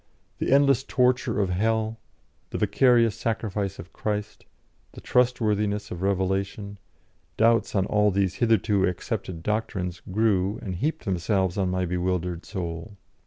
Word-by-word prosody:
The - - -1
endless 140 -2 +4
torture 125 -3 +1
of 95 -3 +1
hell, 110 +3 0 0.5
the - - -4
vicarious 120 -4 +3
sacrifice 105 -3 -2
of 90 - -11
Christ, 105 -1 -4 0.5
the - - -10
trustworthiness 105 -4 +1
of 90 - -5
revelation, 100 +1 -1 0.6
doubts 115 0 +3
on 95 -1 +2
all 105 +1 +3
these 95 -2 +1
hitherto 110 -4 +3
accepted 90 -1 -4
doctrines 95 -4 -2
grew 100 -1 +1
and 95 - -4
heaped 150 - -2
themselves 95 -1 0
on 95 -2 0
my 90 0 0
bewildered 90 -1 -2
soul. 95 +1 -5
100 Hz, 130 wpm, -25 LUFS, 95-110 Hz, 0.6 s, endless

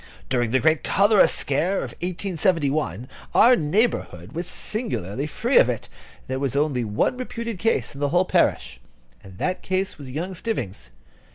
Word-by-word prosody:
During 120 -3 +1
the 130 +3 +2
great 155 +1 +2
cholera 205 +1 +5
scare 155 +8 0
of - - -3
1871, 160 - -1 0.3
our 250 +2 +7
neighbourhood 150 - 0
was 170 +4 -4
singularly 145 - -3
free 235 - +2
from 125 - +4
it. 120 - -4 0.4
There 130 0 -3
was 135 -2 -2
only 140 -4 +1
one 105 - 0
reputed 235 -4 -5
case 225 -5 0
in 140 - -9
the 145 - +1
whole 175 +4 +3
parish: - - +1 0.4
that 95 - -3
case 190 -2 -2
was 140 -2 -8
young 165 +8 -4
Stivvings. 120 - -4
155 Hz, 155 wpm, -23 LUFS, 125-190 Hz, 0.4 s, our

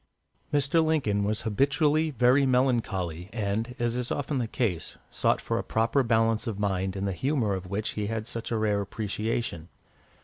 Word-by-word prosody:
Mr. 145 +3 +3
Lincoln 135 -11 +1
was 105 +1 0
habitually 145 - +2
very 130 +1 +4
melancholy, 110 -10 0
and, 110 +2 -2
as 120 0 0
is 125 -1 -2
often 145 -1 -1
the 120 - -1
case, 105 -8 -2
sought - - +1
for - - -2
a - - -3
proper 115 +4 +1
balance 115 -1 +2
of 110 -4 -3
mind 95 -2 -1
in 95 0 -2
the 100 - 0
humour 130 -1 0
of 95 -1 -4
which 105 +2 -1
he 105 -1 -3
had 110 0 -3
such 115 -1 -5
a 115 - 0
rare 105 -2 +1
appreciation. 105 -3 -3
115 Hz, 175 wpm, -27 LUFS, 100-130 Hz, -, very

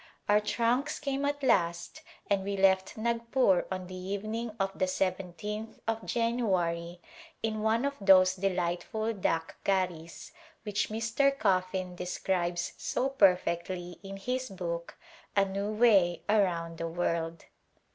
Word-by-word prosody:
Our 205 0 +5
trunks 235 +7 0
came 275 -1 -2
at 285 0 -2
last 175 - +1 0.3
and 200 -1 +1
we 200 0 -2
left 190 0 +3
Nagpur 235 -3 +2
on 185 -1 -3
the 185 - -10
evening 200 +5 -3
of 195 0 0
the 185 - 0
lyth 195 +3 -3
of 225 0 -1
January 185 -8 0 0.4
in 215 -1 -1
one 225 +4 +2
of 280 0 -2
those 185 -1 +6
delightful 190 +4 -1
^' 200 - -12
dak 165 -1 -1
garis'* 180 -4 -2 0.3
which 205 -2 -1
Mr. 230 +6 +1
Coffin 185 -4 0
describes 180 -1 -2
so 265 - 0
perfectly 180 -5 +1
in 195 0 -8
his 255 +5 -3
book 170 -3 -5 0.2
" - - -27
A 200 -1 +4
New 200 +2 -3
Way 205 -6 +4
Around 170 -6 +1
the 165 - -2
World." 165 -1 -2
195 Hz, 135 wpm, -30 LUFS, 180-225 Hz, 0.4 s, those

